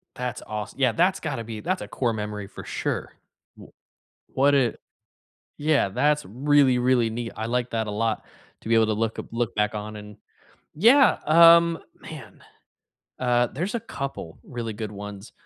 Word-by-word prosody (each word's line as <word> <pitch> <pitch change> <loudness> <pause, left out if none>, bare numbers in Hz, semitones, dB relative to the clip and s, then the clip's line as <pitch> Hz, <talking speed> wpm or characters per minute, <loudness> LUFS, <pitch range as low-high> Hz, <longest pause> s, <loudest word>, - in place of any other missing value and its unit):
That's 125 0 -4
awes 105 -1 -5
yeah, 130 -3 +3
that's 180 +8 +2
gotta 135 -7 -4
be 110 -1 -7
that's - - -2
a 105 - -6
core 120 +2 -1
memory 105 -1 -5
for - - -10
sure. - - -3 0.4
W - - -14 0.6
What 140 +2 +2
did 135 -5 +2 0.8
Yeah. 150 -7 +2
That's 150 +8 +1
really, 135 +3 +3
really 125 -2 +2
neat, 115 0 -5
I 110 - -3
like 125 +1 -1
that 110 -1 -1
a - - -4
lot, 110 +1 -1 0.4
to - - -8
be 115 - +3
able 115 -1 +4
to 110 - 0
look 110 +1 -2
up - - -5
look 115 0 -2
back 105 0 0
on 105 +1 -5
and 105 0 -11 0.6
Yeah. 235 - +5
Um, 170 +1 +7 0.2
man, - - -11 0.8
uh, 120 -1 +2
there's 180 - -4
a 235 - -1
couple 135 - -6
really 120 -3 -5
good 105 0 -6
ones. 105 +1 -9
120 Hz, 175 wpm, -25 LUFS, 110-145 Hz, 0.8 s, Um